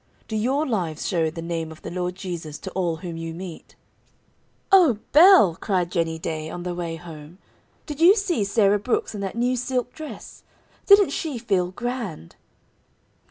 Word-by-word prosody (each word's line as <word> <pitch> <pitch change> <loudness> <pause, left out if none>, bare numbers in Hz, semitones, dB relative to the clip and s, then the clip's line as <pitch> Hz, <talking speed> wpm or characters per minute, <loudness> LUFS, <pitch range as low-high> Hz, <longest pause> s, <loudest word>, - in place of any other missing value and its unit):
Do 220 - -4
your 260 +8 +1
lives 175 - -2
show 165 -4 +1
the 165 +1 -7
name 165 -1 -4
of 160 - -13
the - - -6
Lord 180 0 -3
Jesus 170 -5 -6
to 190 - -8
all 175 -3 -1
whom 165 0 -7
you 165 0 -6
meet?" 175 -1 -9 1.0
"O 345 - +6
Belle!" 310 - +7
cried 180 -3 -1
Jennie 165 -2 -1
Day, 160 -1 -4
on 175 +2 -6
the 180 0 -3
way 170 -2 -4
home. 165 0 -11 0.5
"Did 295 0 -7
you 365 +5 +8
see 370 - 0
Sarah 200 0 +2
Brooks 225 +3 -1
in 205 - -5
that 195 +1 -4
new 245 +2 +1
silk 250 0 -2
dress? 315 -1 -10 0.5
Didn't 400 -6 +7
she 295 -3 -3
feel 195 -6 0
grand?" 230 - -5
190 Hz, 170 wpm, -23 LUFS, 165-245 Hz, 1.0 s, you